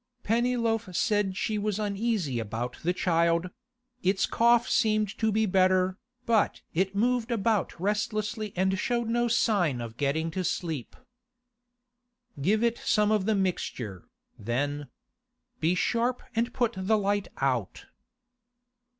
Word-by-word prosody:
Pennyloaf 230 -3 0
said 205 -3 +1
she 215 0 -1
was 205 -1 -1
uneasy 205 - -1
about 115 +3 -4
the 175 - +1
child; 170 0 +1 0.5
its 190 +1 +2
cough 235 0 +3
seemed 215 -3 +1
to 220 -1 +2
be 220 +1 +2
better, 185 -1 +2 0.3
but 230 -3 +2
it 190 +3 0
moved 240 +2 +1
about 220 -5 0
restlessly 210 +2 -1
and 190 +1 +1
showed 235 +1 0
no 240 +1 +1
sign 200 - +2
of 115 -1 -7
getting 155 +4 0
to 185 +3 -2
sleep. 160 -8 -3 1.5
'Give 215 +9 +2
it 235 0 +1
some 210 -1 +2
of 210 -3 +2
the 220 - +3
mixture, 125 - -3 0.3
then. 145 +6 -2 0.7
Be 170 +2 +2
sharp 240 +6 0
and 230 +2 +1
put 240 -2 0
the 190 +4 +1
light 205 0 0
out. 125 -7 -1
200 Hz, 130 wpm, -28 LUFS, 170-225 Hz, 1.5 s, cough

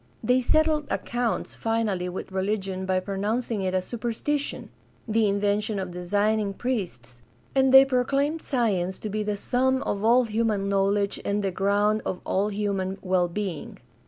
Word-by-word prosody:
They 250 +3 +3
settled 310 +2 +2
accounts 240 -1 -2
finally 215 -5 -1
with 185 +1 -6
religion 190 -1 -2
by 185 0 +2
pronouncing 210 +3 -2
it 185 -1 -1
a 185 - +1
superstition 240 +7 -3 0.2
— - - -34
the 220 0 +2
invention 205 +1 0
of 185 -2 -4
designing 205 +3 0
priests; 170 - -4 0.3
and 265 -1 +3
they 265 +1 +9
proclaimed 275 +4 0
science 195 - 0
to 215 - -6
be 215 +1 -1
the 210 -1 -2
sum 260 +5 +1
of 200 0 -2
all 240 +3 +5
human 215 -3 0
knowledge 200 +1 +1
and 205 0 -1
the 195 - 0
ground 205 +3 +1
of 180 - -3
all 195 +2 +1
human 195 -2 -2
well 185 -2 +2
being. 175 -3 -5
205 Hz, 160 wpm, -26 LUFS, 190-235 Hz, 0.3 s, they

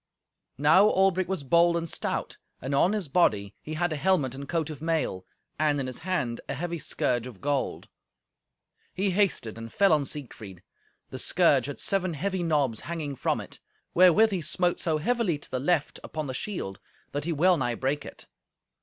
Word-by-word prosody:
Now 155 +8 +6
Albric 190 -2 +2
was 190 -6 -2
bold 170 +5 +4
and 165 0 -3
stout, - - -4 0.2
and 135 +3 -4
on 175 +8 +3
his 205 -6 -2
body 105 - +2
he 155 - -6
had 175 0 0
a - - -3
helmet 150 -7 +1
and 140 +1 -8
coat 160 -2 -1
of 150 - -9
mail, 155 - -1 0.3
and 150 -2 +2
in 135 - -2
his 130 -1 -6
hand 155 -10 -2
a - - -2
heavy 170 +3 -3
scourge 125 -4 -1
of 115 -7 -11
gold. 140 -1 -2 1.1
He 195 +1 +1
hasted 175 - 0
and 115 0 -8
fell 195 -4 +4
on 150 -2 +2
Siegfried. 110 - -8 0.5
The - - -5
scourge - - +3
had 145 - -6
seven 185 -4 -1
heavy 190 +4 -2
knobs 145 -9 +1
hanging 155 -5 -4
from - - 0
it, - - -9 0.3
wherewith 185 +5 +6
he 190 -3 -1
smote 175 +3 0
so 160 -2 0
heavily 210 -1 0
to 145 - -14
the 130 - -1
left 150 +2 0
upon 155 -1 -4
the 130 - -4
shield 125 - -4 0.3
that 145 +1 -3
he 170 - -1
well 175 +4 +4
nigh 120 -4 -1
brake 135 +4 -1
it. - - -11
155 Hz, 190 wpm, -27 LUFS, 135-180 Hz, 1.1 s, Now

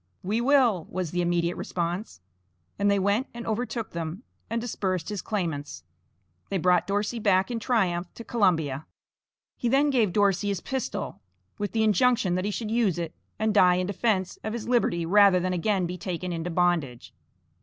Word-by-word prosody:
"We 210 +5 0
will," 245 - +3
was 180 -3 -3
the 180 - 0
immediate 175 0 0
response. 175 - -4 0.6
And 200 0 +3
they 200 - +3
went 200 +6 +1
and 235 - -6
overtook 225 0 -3
them, 170 +5 -5 0.3
and 230 +1 -1
dispersed 190 -7 -2
his 205 -3 -3
claimants. 165 -9 -3 0.7
They 195 - 0
brought 180 -1 +3
Dorsey 205 +4 -1
back 195 -1 +2
in 235 - -2
triumph 185 -7 0
to 230 - -8
Columbia. 160 - +1 0.7
He 240 - -1
then 280 +3 +3
gave 230 -8 +2
Dorsey 200 0 +2
his 200 -3 -1
pistol, 260 - -4 0.4
with 205 0 -2
the 220 -1 +2
injunction 220 -1 +3
that 185 +2 -1
he - - 0
should 215 +1 -4
use 225 -7 +2
it 170 -2 -4 0.2
and 220 0 +1
die 180 -3 +6
in 180 0 0
defence 200 -1 -1
of 215 - -3
his 235 -2 -5
liberty 230 -9 +1
rather 200 +1 +6
than 185 +1 -1
again 190 +1 +1
be 180 +1 -5
taken 180 0 -4
into 165 +1 -3
bondage. 165 -8 0
195 Hz, 175 wpm, -26 LUFS, 175-220 Hz, 0.7 s, die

